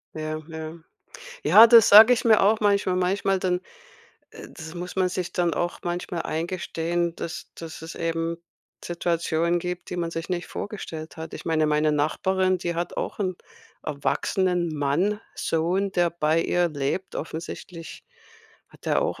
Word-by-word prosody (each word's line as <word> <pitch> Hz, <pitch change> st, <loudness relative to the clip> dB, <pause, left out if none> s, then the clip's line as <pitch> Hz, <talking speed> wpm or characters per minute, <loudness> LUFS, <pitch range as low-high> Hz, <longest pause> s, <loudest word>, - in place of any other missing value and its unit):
Ja, 155 Hz, 0 st, -4 dB
ja. 160 Hz, 0 st, -7 dB, 0.7 s
Ja, 225 Hz, +2 st, +9 dB
das 230 Hz, -2 st, +8 dB
sage 220 Hz, +4 st, +10 dB
ich 245 Hz, -, -2 dB
mir 220 Hz, -2 st, +6 dB
auch 215 Hz, +3 st, +4 dB
manchmal. 200 Hz, -3 st, +2 dB
Manchmal 190 Hz, +1 st, +1 dB
dann 180 Hz, -1 st, 0 dB, 0.7 s
äh, 445 Hz, -1 st, -11 dB
das 160 Hz, -1 st, -10 dB
muss 180 Hz, +2 st, -6 dB
man 185 Hz, -1 st, +2 dB
sich 180 Hz, -1 st, -3 dB
dann 175 Hz, -1 st, +1 dB
auch 175 Hz, +3 st, -2 dB
manchmal 175 Hz, -1 st, -3 dB
eingestehen, 170 Hz, +1 st, -2 dB
dass 170 Hz, +1 st, -7 dB
dass 165 Hz, -1 st, -9 dB
es 165 Hz, -, -7 dB
eben 165 Hz, 0 st, -2 dB, 0.4 s
Situationen 170 Hz, 0 st, 0 dB
gibt, 180 Hz, +1 st, -5 dB
die 180 Hz, -, -4 dB
man 170 Hz, -1 st, -2 dB
sich 165 Hz, +1 st, -5 dB
nicht 180 Hz, -1 st, -2 dB
vorgestellt 165 Hz, -7 st, -7 dB
hat. 160 Hz, 0 st, -7 dB
Ich -, -, -8 dB
meine, 160 Hz, -2 st, +1 dB
meine 150 Hz, 0 st, +2 dB
Nachbarin, 185 Hz, +5 st, +1 dB
die 170 Hz, -1 st, -3 dB
hat 170 Hz, +1 st, -3 dB
auch -, -, -4 dB
'n 185 Hz, -3 st, -1 dB, 0.5 s
erwachsenen 175 Hz, +4 st, 0 dB
Mann, 165 Hz, +9 st, 0 dB
Sohn, 180 Hz, +5 st, 0 dB
der 175 Hz, -1 st, +2 dB
bei 165 Hz, -1 st, +1 dB
ihr 175 Hz, -1 st, +1 dB
lebt. 145 Hz, +6 st, -3 dB
Offensichtlich 165 Hz, +1 st, -7 dB, 0.7 s
hat -, -, -19 dB
er -, -, +2 dB
auch -, -, -2 dB
175 Hz, 160 wpm, -25 LUFS, 160-185 Hz, 0.7 s, sage